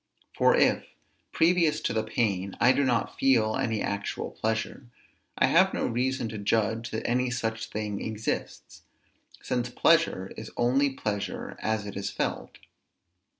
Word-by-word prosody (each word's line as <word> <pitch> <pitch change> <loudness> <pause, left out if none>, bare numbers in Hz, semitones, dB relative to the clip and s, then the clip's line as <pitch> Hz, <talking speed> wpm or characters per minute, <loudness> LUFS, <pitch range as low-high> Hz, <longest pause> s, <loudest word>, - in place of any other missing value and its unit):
For - - +4
if, - - +3 0.5
previous 165 -2 +3
to - - -1
the 110 - +1
pain, 100 -4 -1
I 125 - +6
do 140 - +2
not 120 -3 0
feel 115 -5 +3
any 110 -3 -1
actual 100 0 -3
pleasure, 110 +3 -3 0.5
I - - +4
have - - +4
no - - -1
reason 125 +1 -1
to 110 -1 -6
judge 115 +3 0
that 110 - -4
any 125 +1 +1
such 115 -2 -3
thing 105 -2 -4
exists; 110 0 -4 0.6
since 125 -1 -1
pleasure 125 - +2
is - - -8
only 130 +4 +3
pleasure 105 -7 -4
as 110 -1 -1
it 100 - -7
is 100 0 -3
felt. 100 - -3
110 Hz, 150 wpm, -27 LUFS, 105-125 Hz, 0.6 s, I